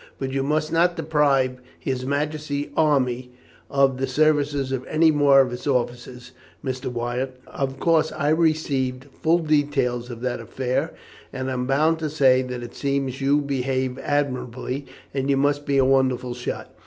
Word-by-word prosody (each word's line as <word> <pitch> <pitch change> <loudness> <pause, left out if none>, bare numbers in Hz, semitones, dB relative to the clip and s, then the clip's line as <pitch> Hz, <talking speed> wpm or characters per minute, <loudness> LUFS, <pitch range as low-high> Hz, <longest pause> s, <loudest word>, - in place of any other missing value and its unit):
But 135 -1 -3
you 135 0 0
must 155 +3 0
not 170 +1 +3
deprive 145 -5 +1 0.2
His 130 -1 -3
Majesty's 145 0 -2
army 130 -5 +1 0.4
of 135 -2 +3
the 135 - 0
services 145 -1 +1
of 130 -1 -2
any 160 +1 +4
more 145 -2 +6
of 125 -2 -1
its 125 - -6
officers, 125 -1 -2 0.3
Mr. 130 -1 -3
Wyatt. 125 +2 -3
Of 135 -1 -4
course 160 -1 +2
I 145 - 0
received 145 -5 +1 0.2
full 165 +2 +4
details 145 -6 0
of 120 -1 -8
that 125 -1 -2
affair, 130 +6 -2 0.4
and 130 0 -3
I - - -1
am 125 0 -2
bound 155 +4 +2
to 155 -1 -2
say 135 -4 +4
that 125 -1 -5
it 120 - -9
seems 140 -2 -2
you 140 +2 +3
behaved 130 -2 -2
admirably, 130 -1 -2 0.3
and 135 0 -1
you 140 - +3
must 145 +1 +1
be 140 -1 +2
a 135 - +4
wonderful 130 -2 +2
shot. 120 0 -6
135 Hz, 165 wpm, -23 LUFS, 130-145 Hz, 0.4 s, more